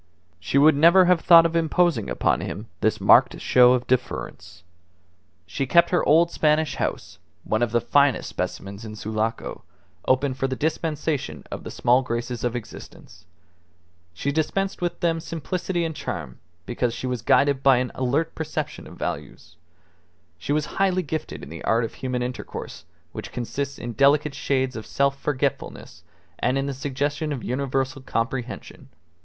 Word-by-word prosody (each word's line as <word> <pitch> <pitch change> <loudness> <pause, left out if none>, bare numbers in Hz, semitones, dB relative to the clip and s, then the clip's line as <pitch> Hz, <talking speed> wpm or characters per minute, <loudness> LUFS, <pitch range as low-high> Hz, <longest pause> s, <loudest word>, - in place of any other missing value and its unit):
She 100 +9 -1
would 150 +2 +6
never 170 +5 +6
have 180 -2 +3
thought 165 -2 +8
of 165 0 -1
imposing 165 - +1
upon - - +1
him - - -5
this - - +1
marked - - +5
show 125 0 +5
of 125 -1 0
deference. 125 -7 -3 0.8
She 110 +10 -3
kept 170 +5 +4
her 175 - +2
old 165 +3 +5
Spanish 155 0 +1
house 95 - -4 0.2
(one 110 - -1
of 120 -2 +1
the 120 - +3
finest 140 0 +2
specimens 100 +2 -5
in 110 -1 -8
Sulaco) 110 +1 -3 0.5
open 130 +1 +2
for 135 +1 -2
the 130 - -3
dispensation 150 - -2
of - - -6
the - - -7
small 125 +2 +2
graces 120 -1 -4
of 120 -1 -1
existence. 95 -6 -10 0.9
She 115 +11 -3
dispensed 190 +6 -1
them 170 -1 0
with - - -6
simplicity 170 +2 -3
and 160 -1 -4
charm 60 - -6 0.3
because 120 +2 -2
she - - -5
was 125 -3 -2
guided 140 +2 +3
by 135 -2 +5
an 125 0 -1
alert 140 +6 -1
perception 155 -1 -5
of - - -13
values. 80 - -6 0.8
She 110 - -4
was 150 0 +1 0.2
highly 185 -1 +2
gifted 155 0 -5
in - - -9
the - - -9
art 115 +1 +2
of 115 - -4
human 125 -1 -3
intercourse 125 0 -7 0.3
which - - -8
consists 140 +3 -4
in 120 -1 -6
delicate 140 +3 +3
shades 130 -2 -1
of 110 - -7
self 140 0 0
forgetfulness 135 - -3 0.4
and 130 - +1
in 135 - -1
the 140 - -3
suggestion 145 +3 -2
of 135 -5 -4
universal 135 +1 -2
comprehension. 125 0 -4
135 Hz, 160 wpm, -24 LUFS, 120-155 Hz, 0.9 s, thought